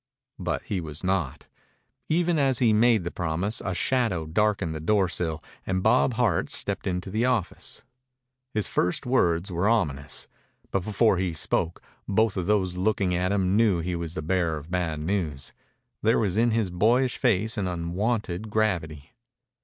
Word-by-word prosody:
But - - -2
he 95 -3 -2
was 75 0 -8
not. 90 -7 -1 0.6
Even 170 0 +2
as 135 -3 +2
he 115 -4 +4
made 110 -2 +4
the 85 - -4
promise 90 +7 -2
a 95 -2 -2
shadow 115 -11 +1
darkened 95 0 +1
the 80 - -4
doorsill 90 -3 0 0.2
and 95 0 -1
Bob 125 -1 +3
Hart 110 -8 +1
stepped - - -2
into 90 +1 -2
the 110 +4 +1
office. 125 -8 -2 0.7
His 105 -3 0
first 90 - 0
words 90 -8 +1
were 90 +5 +1
ominous, 75 -12 -1 0.4
but 95 - 0
before 110 0 +2
he 90 -2 -1
spoke 80 +2 -1 0.2
both 110 +1 +2
of 90 -2 -2
those 95 -4 +1
looking 95 -1 +1
at 90 +1 0
him 95 -1 +1
knew 105 -5 +3
he 90 +1 -2
was 85 0 -5
the 80 - -3
bearer 85 -2 0
of 75 +3 -10
bad 85 -4 -1
news. 80 -6 -2 0.5
There 110 +2 +3
was 100 -5 0
in 115 +2 +3
his 110 -5 0
boyish 120 +8 +2
face 110 -2 +2
an 100 -4 -1
unwonted 90 +3 -2
gravity. 85 -9 -1
95 Hz, 165 wpm, -26 LUFS, 85-110 Hz, 0.7 s, he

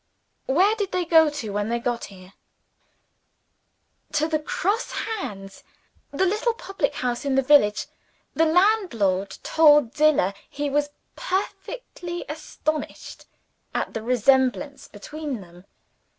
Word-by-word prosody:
"Where 370 +10 +4
did 405 -3 -2
they 360 -1 0
go 320 -2 +6
to, 265 -8 -5
when 205 +1 -2
they 235 - 0
got 235 0 -2
here?" 185 -1 -14 1.8
"To 310 - +2
the 315 -1 0
Cross 400 +8 -1
Hands 200 - -5 0.5
the 370 +7 0
little 430 +5 0
public 390 -10 -2
house 245 -1 -2
in 275 -2 0
the 270 - +3
village. 255 -7 +4 0.5
The 325 - +3
landlord 285 - +2
told 295 -6 +5
Zillah 300 -11 +3 0.2
he 290 -1 -3
was 290 +1 +1 0.3
perfectly 365 -2 -4
astonished 310 0 -5 0.5
at - - -2
the 225 - -3
resemblance 260 +4 +1
between 285 +4 -6
them. 175 0 -15
290 Hz, 120 wpm, -24 LUFS, 230-340 Hz, 1.8 s, go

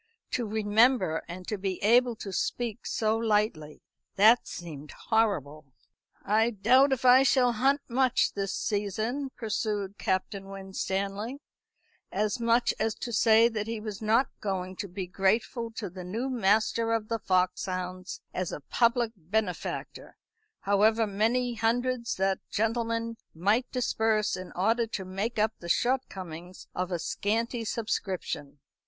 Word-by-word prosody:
To 240 -3 -1
remember, 215 -4 +3
and 180 +1 -8
to 210 - -3
be 190 -1 -2
able 240 +3 +4
to 200 -3 -7
speak 235 +1 -2
so 220 0 +1
lightly. 210 -9 0 0.3
That 220 +4 +6
seemed 155 -4 -8 0.2
horrible. 155 - +1 0.6
"I 220 +3 +3
doubt 245 +6 +4
if 260 -1 -1
I 255 +1 +8
shall 260 -2 +4
hunt 270 +5 +2
much 260 +1 +2
this 195 -1 -2
season," 215 +8 -2
pursued 210 -3 -2
Captain 195 +1 -2
Winstanley, 195 +5 -3 0.7
as 210 +4 0
much 235 +1 +3
as 220 0 0
to 240 - -6
say 225 +1 +6
that 215 -2 -3
he 225 -1 -3
was 210 -1 -6
not 225 +5 +3
going 190 -2 -3
to 200 - -4
be 185 +1 -5
grateful 215 +6 0
to 215 -2 -4
the 180 0 -8
new 230 +9 -3
master 225 0 +2
of 220 -2 -1
the 230 0 -2
foxhounds 185 -1 -1
as 185 -1 -2
a - - -5
public 235 - +1
benefactor, 185 +1 -4 0.4
however 215 +3 +3
many 230 +5 +1
hundreds 235 +2 0
that 190 0 +1
gentleman 230 +1 -1 0.2
might 205 +9 +1
disburse 220 -4 +1
in 185 0 -8
order 225 +5 +1
to 195 -4 -5
make 195 +6 -3
up 215 +1 +2
the 170 - -8
shortcomings 185 -8 -2
of 180 0 -3
a 175 - 0
scanty 230 +7 -1
subscription. 190 -10 -3
215 Hz, 140 wpm, -28 LUFS, 190-230 Hz, 0.7 s, I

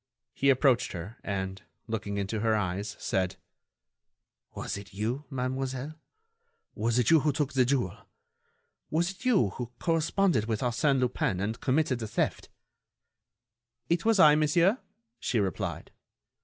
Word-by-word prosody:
He 140 - +2
approached 130 -2 +3
her 95 +7 -7
and, 95 -1 -3 0.2
looking 105 -3 -3
into 100 +2 -2
her 110 0 +2
eyes, 100 0 -2
said: 95 -1 -1 1.2
"Was - - -4
it 100 0 -10
you, 120 +8 -2
mademoiselle? 130 +1 -3 0.8
Was 115 +2 0
it 125 +2 +3
you 165 - +7
who 150 +1 +1
took 145 0 -1
the 130 -2 +4
jewel? 115 -5 -1 0.8
Was 170 +4 +1
it 195 +6 -14
you 205 - +4
who 120 +3 -6
corresponded 165 - +1
with 110 -2 -1
Arsène 130 +3 +2
Lupin 120 -6 0
and 110 +4 -2
committed 135 -2 +1
the 110 - -4
theft?" - - -2 1.4
"It 170 0 +1
was 225 -2 +3
I, 150 -4 +8
monsieur," 170 - +3 0.4
she 120 - 0
replied. 95 -4 -3
125 Hz, 140 wpm, -29 LUFS, 105-150 Hz, 1.4 s, I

